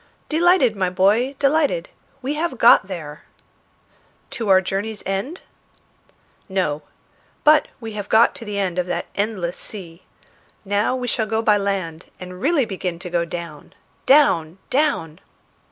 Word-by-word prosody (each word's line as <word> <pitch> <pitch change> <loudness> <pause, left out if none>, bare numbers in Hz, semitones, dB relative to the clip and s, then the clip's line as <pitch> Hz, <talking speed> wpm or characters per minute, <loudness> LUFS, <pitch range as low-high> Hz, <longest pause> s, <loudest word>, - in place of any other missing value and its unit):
"Delighted, 325 - +3
my 190 -2 0
boy, 210 +9 +2
delighted. 310 - +1 0.3
We 275 +3 -1
have 310 -3 -2
got 230 -4 +6
there." 155 -6 -8 1.1
"To 230 -6 -4
our 190 -1 +7
journey's 200 +3 -4
end?" 195 - -3 1.1
"No; 180 -6 -1 0.6
but 305 0 +5
we 225 -2 -7
have 205 -1 -6
got 225 +2 +5
to - - -8
the 210 -2 -5
end 185 -3 -1
of 180 - -1
that 175 -1 -2
endless 200 -4 -2
sea. 175 -5 -10 0.6
Now 205 +5 +1
we 250 -1 -3
shall 220 -2 -1
go 220 +1 -1
by 210 -2 +4
land, 190 -5 -3
and 180 0 -9
really 290 -2 +2
begin 185 -4 -4
to 180 0 -8
go 170 -1 +1
down! 170 -3 -8 0.3
down! 180 - +4
down!" 255 - 0
200 Hz, 145 wpm, -21 LUFS, 180-255 Hz, 1.1 s, our